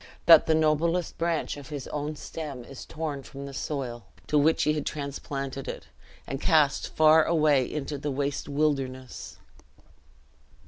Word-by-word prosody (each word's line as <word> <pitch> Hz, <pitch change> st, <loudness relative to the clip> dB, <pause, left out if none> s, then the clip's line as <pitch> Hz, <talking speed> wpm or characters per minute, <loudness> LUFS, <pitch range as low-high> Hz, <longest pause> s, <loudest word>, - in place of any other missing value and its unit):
that 165 Hz, -2 st, +8 dB
the 160 Hz, -, +4 dB
noblest 160 Hz, +3 st, +1 dB
branch 165 Hz, -3 st, -1 dB
of 140 Hz, -2 st, -10 dB
his 145 Hz, -4 st, -6 dB
own 150 Hz, +1 st, -3 dB
stem 145 Hz, -5 st, -7 dB
is 135 Hz, +2 st, -10 dB
torn 155 Hz, -3 st, -4 dB
from 140 Hz, +1 st, -9 dB
the 140 Hz, -, -8 dB
soil 130 Hz, -5 st, -4 dB, 0.2 s
to 150 Hz, -, -2 dB
which 150 Hz, +2 st, +4 dB
he 150 Hz, -, +2 dB
had 150 Hz, -, -2 dB
transplanted 140 Hz, -2 st, -5 dB
it, -, -, -7 dB, 0.4 s
and 135 Hz, +1 st, -5 dB
cast 150 Hz, -4 st, +2 dB
far 155 Hz, 0 st, +6 dB
away 150 Hz, -5 st, +2 dB
into 145 Hz, -1 st, -4 dB
the 145 Hz, -, -3 dB
waste 140 Hz, +1 st, -2 dB
wilderness!" 135 Hz, -3 st, -2 dB
145 Hz, 150 wpm, -27 LUFS, 135-155 Hz, 0.4 s, that